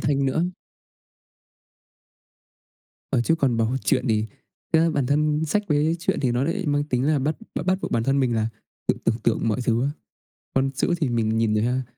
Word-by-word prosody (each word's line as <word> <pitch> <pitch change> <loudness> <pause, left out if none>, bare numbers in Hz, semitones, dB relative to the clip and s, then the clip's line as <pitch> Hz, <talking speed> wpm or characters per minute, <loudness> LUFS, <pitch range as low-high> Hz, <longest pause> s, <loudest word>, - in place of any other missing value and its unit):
thanh 140 -1 +1
nữa. 160 +6 +1 2.7
Ờ, - - +2
chứ 165 +7 +2
còn 135 -7 +1
bảo 115 +3 +1
truyện - - +2
thì 110 0 +1 0.5
ra 165 0 +4
bản 140 -5 0
thân 150 +2 +1
sách 205 +7 +1
với 155 +3 +2
truyện 170 - -1
thì 125 -4 +1
nó 125 +2 +1
lại 170 +4 -2
mang 145 0 +1
tính 125 -4 -1
là 155 -2 +3
bắt 150 +4 -1 0.2
bắt - - -3
bắt 185 0 +2
buộc - - -3
bản 115 - +1
thân 135 +1 +2
mình 120 -3 +1
là 110 0 +1 0.4
tự - - +3
tưởng 115 +1 +1
tượng 115 0 +1
mọi 110 - 0
thứ 120 0 +2
á. 140 - +1 0.6
Còn 135 0 +2
chữ 135 - -1
thì 150 - +1
mình 110 -2 0
nhìn 110 -1 +2
ra, 125 +4 +1
135 Hz, 200 wpm, -24 LUFS, 115-150 Hz, 2.7 s, ra